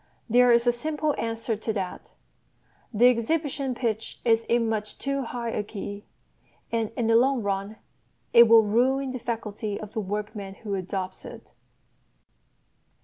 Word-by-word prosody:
There 245 +1 +5
is 235 0 +4
a 240 - +5
simple 300 +4 -2
answer 225 0 -2
to 220 +1 -3
that: 190 -3 -5 0.8
The 240 +2 +5
exhibition 270 +2 -1
pitch 225 -2 -3
is 225 -1 +3
in 235 -1 +2
much 215 -1 -3
too 275 0 -2
high 235 -2 -4
a 215 - -1
key, 205 0 -7 0.7
and 225 -2 0
in 240 - 0
the 225 0 +3
long 255 0 +3
run 200 +1 -2 0.6
it 235 0 +9
will 225 0 +7
ruin 255 +5 +1
the 255 - -5
faculty 215 -3 -4
of 215 -1 -9
the 220 - -1
workman 205 0 -5
who 205 -2 -3
adopts 185 0 -4
it. - - -11
225 Hz, 150 wpm, -26 LUFS, 210-245 Hz, 0.8 s, it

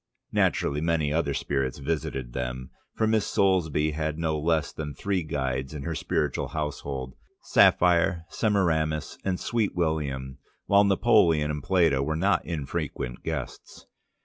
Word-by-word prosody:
Naturally 75 +1 +1
many 80 -3 +1
other 75 -4 0
spirits 65 -2 -1
visited 65 -4 -3
them, 65 0 -4 0.2
for 110 - +1
Miss 110 -1 +2
Soulsby 80 -6 +2
had 75 0 -2
no 80 -2 -1
less 80 +1 +1
than 75 -2 -6
three 100 -2 -1
guides 65 -2 -3
in 70 - -5
her 85 - -3
spiritual 75 -3 -1
household, 70 -3 -4 0.3
Sapphire, 85 -1 +4
Semiramis, 80 -9 0
and 95 -2 -1
Sweet 115 -2 -1
William, 70 -6 -2 0.3
while 100 0 +5
Napoleon 95 -7 +3
and 75 -1 -4
Plato 85 -5 +2
were 75 +3 -1
not 95 +4 +2
infrequent 70 -5 -4
guests. 75 -6 -6
80 Hz, 135 wpm, -26 LUFS, 70-85 Hz, 0.3 s, while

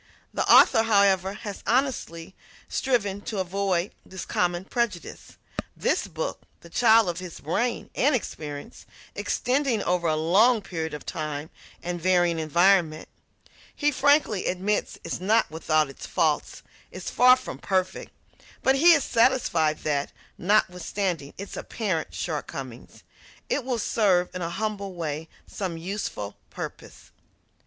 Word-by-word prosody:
The - - +1
author, 225 - +7
however, 200 -3 +3
has 205 -1 -7
honestly 225 -9 -1 0.3
striven 205 -7 0
to 210 - -5
avoid 190 0 0
this 190 -1 -8
common 175 +1 0
prejudice. 220 -7 -3 0.4
This - - 0
book, - - -4 0.2
the 170 - -15
child 225 -1 +5
of 175 0 -2
his 180 -2 -8
brain, 230 +11 -2
and 285 +2 +3
experience, 150 -3 -6 0.3
extending 255 -4 0
over 175 -1 0
a 155 - +2
long 200 +9 +4
period 160 -3 -4
of 150 - -9
time 155 -2 -4 0.3
and 175 0 -4
varying 175 -2 +2
environment, 170 0 +2 0.7
he 295 0 +2
frankly 285 -7 +2
admits 195 +3 -1
is 170 - -4
not 220 +2 +2
without 155 -1 +1
its 135 - -10
faults 155 -2 0 0.3
is - - -7
far 250 +1 +7
from 255 - -8
perfect; 190 -1 -1 0.5
but 265 - +5
he 340 +5 +7
is 290 -5 +3
satisfied 230 -11 +2
that, 145 -2 -1 0.2
notwithstanding 180 -5 0
its 200 +1 -7
apparent 190 -8 -3
shortcomings, 135 -6 -6 0.5
it 280 - 0
will 250 -1 -1
serve 195 -5 +2
in 180 - -5
a 170 - -2
humble 200 0 -3
way 160 -1 -4 0.2
some 185 -5 -5
useful 165 - -5
purpose. - - -9
185 Hz, 130 wpm, -26 LUFS, 165-220 Hz, 0.7 s, author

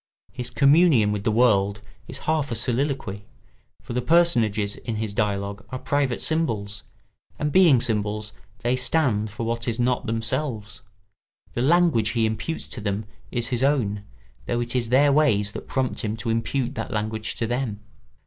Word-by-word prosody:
His 125 - -6
communion 140 -6 +4
with 105 -1 -3
the 110 - +3
world 105 -3 +3 0.3
is - - -6
half 155 -4 0
a - - -1
soliloquy, 120 -4 -1 0.6
for - - -6
the 125 - 0
personages 120 -10 +2
in 115 - -5
his 110 -1 -3
dialogue 100 0 -2
are 130 - -4
private 140 -1 -1
symbols, 105 -11 -1 0.6
and 150 0 -1
being 165 -7 +6
symbols 105 -2 -1 0.3
they 120 +2 +2
stand 125 -5 +1
for 105 +3 -5
what 115 +1 -2
is 115 0 -1
not 125 0 0
themselves; 115 -2 -3 0.7
the 120 - -1
language 145 -7 +3
he 115 -2 +2
imputes 110 +9 -3
to 120 - -7
them 100 +1 -2 0.2
is 120 -1 -2
his 125 -2 0
own, 120 -8 +1 0.4
though 120 - 0
it 120 +1 -2
is 120 -2 0
their 140 +3 +5
ways 110 -9 +3
that - - -8
prompt 130 -2 -1
him 110 0 -2
to 115 +1 -2
impute 120 +3 -1
that - - -4
language 110 -1 -3
to 115 - -2
them. 120 -3 -2
115 Hz, 170 wpm, -24 LUFS, 105-135 Hz, 0.7 s, being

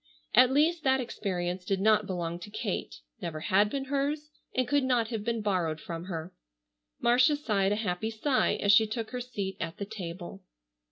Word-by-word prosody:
At 255 - +7
least 310 +4 +2
that 265 -1 +3
experience 180 -6 -3
did 195 +1 0
not 215 0 +3
belong 175 -2 -3
to 195 - -9
Kate, 210 - -4 0.2
never 155 -2 -4
had 195 +6 +3
been 270 +3 -3
hers, 290 +2 -1 0.2
and 255 -1 +1
could 285 -1 +2
not 245 -4 +1
have 225 -4 -3
been 230 -1 -1
borrowed 175 -6 0
from 165 +2 -6
her. 170 -1 -5 0.7
Marcia 250 +5 +4
sighed 205 -9 +1
a - - +2
happy 210 0 -2
sigh 255 +5 +1
as 200 - +2
she 220 +1 +6
took 220 +1 -4
her 250 -1 -3
seat 200 -6 -4
at 165 - -4
the 200 - -4
table. 185 -2 -7
210 Hz, 185 wpm, -29 LUFS, 185-250 Hz, 0.7 s, At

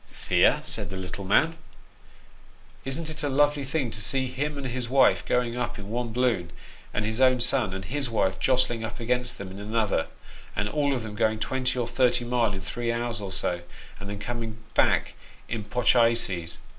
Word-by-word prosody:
" - - -27 0.2
Fear! - - +4
" - - -15
said 105 -5 -2
the 95 - -5
little 95 +1 -6
man: 160 +12 +3 0.6
" - - -27
isn't 135 +5 -2
it 155 0 -3
a 145 - 0
lovely 145 +1 +3
thing 135 -3 -1
to 110 - -4
see 130 +3 +1
him 145 +3 -3
and 140 - -4
his 125 -1 -3
wife 135 +1 +4
a - - -17
going 120 -1 +1
up 120 -1 -2
in 100 0 -8
one 120 0 -2
balloon, 115 -8 +1 0.4
and 105 - -1
his 110 +4 -2
own 130 -1 +5
son 120 -4 +1
and 95 0 -5
his 135 +4 -2
wife 100 -4 +1
a - - -14
jostling 125 -3 +2
up 110 +1 -5
against 125 +1 -1
them 95 -2 -7
in 95 - -8
another, 105 -4 0 0.5
and 105 - 0
all 140 +5 +1
of 125 - -3
them 110 -2 -6
going 110 0 +1
twenty 130 +1 -1
or 120 -2 0
thirty 120 0 +2
mile 120 -3 +1
in 95 - -4
three 120 +5 -2
hours 115 -2 -2
or 100 -2 -5
so, 90 -2 -2 0.4
and 100 - -7
then 100 - -4
coming 115 +1 -4 0.2
back - - +3 0.3
in 115 -2 -3
pochayses 115 -6 +2
120 Hz, 210 wpm, -27 LUFS, 105-130 Hz, 0.6 s, own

